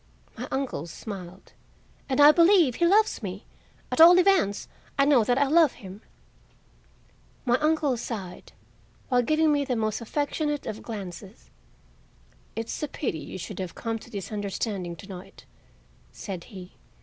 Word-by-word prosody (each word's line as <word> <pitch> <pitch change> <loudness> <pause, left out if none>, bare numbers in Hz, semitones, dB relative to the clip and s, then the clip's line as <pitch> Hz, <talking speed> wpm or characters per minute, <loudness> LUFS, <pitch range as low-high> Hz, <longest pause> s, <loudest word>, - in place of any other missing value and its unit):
My 250 - -6
uncle 265 - -3
smiled. 185 0 -9 0.6
"And 265 - 0
I 290 +1 +9
believe 335 - +4
he 340 - +3
loves 425 -1 +3
me; 195 -1 -6 0.5
at - - +2
all 345 +2 +10
events, 365 - +2 0.3
I 275 - +4
know 275 -5 +5
that 245 +3 +1
I 285 - +4
love 310 0 +4
him." 195 -2 -11 1.4
My 245 0 +2
uncle 305 -3 +1
sighed, 205 -6 -7 0.6
while 250 -2 +3
giving 310 +4 +2
me 285 -1 +1
the 260 -3 -2
most 215 0 -1
affectionate 295 +4 -2
of 215 - -5
glances. 200 -1 -9 1.0
"It's 225 0 -4
a 300 - -1
pity 255 - -3
you - - -8
should 180 - -7
have 185 -2 -5
come 225 -1 -3
to 235 - -14
this 200 -4 -6
understanding 200 -3 -3
to 195 - -13
night," 185 -2 -11 0.7
said 185 -3 -7
he. 185 -2 -11
235 Hz, 150 wpm, -26 LUFS, 195-295 Hz, 1.4 s, all